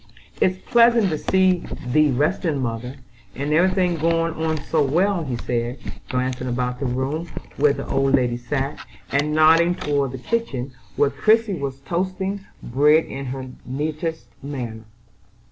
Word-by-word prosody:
"It's 185 Hz, 0 st, +3 dB
pleasant 235 Hz, -2 st, +4 dB
to 155 Hz, -, 0 dB
see 185 Hz, -1 st, +3 dB, 0.3 s
thee 150 Hz, +4 st, +3 dB
resting, 150 Hz, +4 st, 0 dB
mother, 125 Hz, +1 st, -3 dB, 0.4 s
and 145 Hz, +3 st, -1 dB
every 175 Hz, +4 st, +5 dB
thing 180 Hz, -2 st, +1 dB
going 165 Hz, +1 st, +1 dB
on 160 Hz, 0 st, -1 dB
so 150 Hz, +2 st, 0 dB
well," 175 Hz, +6 st, +1 dB
he 130 Hz, -5 st, -3 dB
said, 120 Hz, +1 st, -2 dB, 0.3 s
glancing 130 Hz, 0 st, -2 dB
about 125 Hz, 0 st, -2 dB
the 135 Hz, -, -1 dB
room, 135 Hz, +7 st, -2 dB, 0.3 s
where 145 Hz, 0 st, +4 dB
the -, -, -5 dB
old 135 Hz, 0 st, +2 dB
lady 125 Hz, -3 st, +1 dB
sat, 135 Hz, +3 st, -3 dB, 0.3 s
and 145 Hz, +2 st, +1 dB
nodding 165 Hz, +3 st, +5 dB
toward 140 Hz, -6 st, -1 dB
the -, -, -4 dB
kitchen, 135 Hz, -, -2 dB, 0.2 s
where 140 Hz, -1 st, +3 dB
Christie 215 Hz, -, +3 dB
was 140 Hz, -5 st, -4 dB
toasting 190 Hz, +5 st, -2 dB, 0.2 s
bread 150 Hz, +6 st, +4 dB
in 135 Hz, 0 st, -6 dB
her 130 Hz, +1 st, -5 dB, 0.2 s
neatest 155 Hz, +1 st, -3 dB, 0.2 s
manner. 120 Hz, -6 st, -6 dB
145 Hz, 150 wpm, -22 LUFS, 130-170 Hz, 0.4 s, every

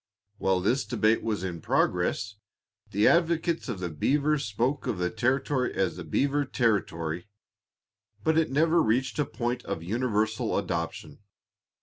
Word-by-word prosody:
While 95 Hz, -1 st, +2 dB
this 120 Hz, +8 st, +1 dB
debate 110 Hz, -2 st, +2 dB
was 110 Hz, -4 st, -2 dB
in 85 Hz, -3 st, -4 dB
progress 100 Hz, +6 st, 0 dB, 0.6 s
the 105 Hz, +2 st, +3 dB
advocates 170 Hz, -2 st, +2 dB
of 110 Hz, -6 st, -3 dB
the 90 Hz, -2 st, -3 dB
beaver 145 Hz, -, +1 dB
spoke 120 Hz, +4 st, -1 dB
of 105 Hz, -, -1 dB
the 90 Hz, 0 st, -1 dB
territory 130 Hz, +1 st, 0 dB
as 95 Hz, -4 st, 0 dB
the 90 Hz, -, -7 dB
beaver 140 Hz, -, +1 dB
territory, 90 Hz, -, -1 dB, 1.0 s
but 160 Hz, 0 st, +2 dB
it 160 Hz, -1 st, +2 dB
never 160 Hz, +5 st, +3 dB
reached 125 Hz, +3 st, 0 dB
a 150 Hz, -, +2 dB
point 120 Hz, 0 st, -3 dB
of 80 Hz, -, -4 dB
universal 110 Hz, +1 st, 0 dB
adoption. 85 Hz, -1 st, -3 dB
115 Hz, 140 wpm, -27 LUFS, 95-140 Hz, 1.0 s, the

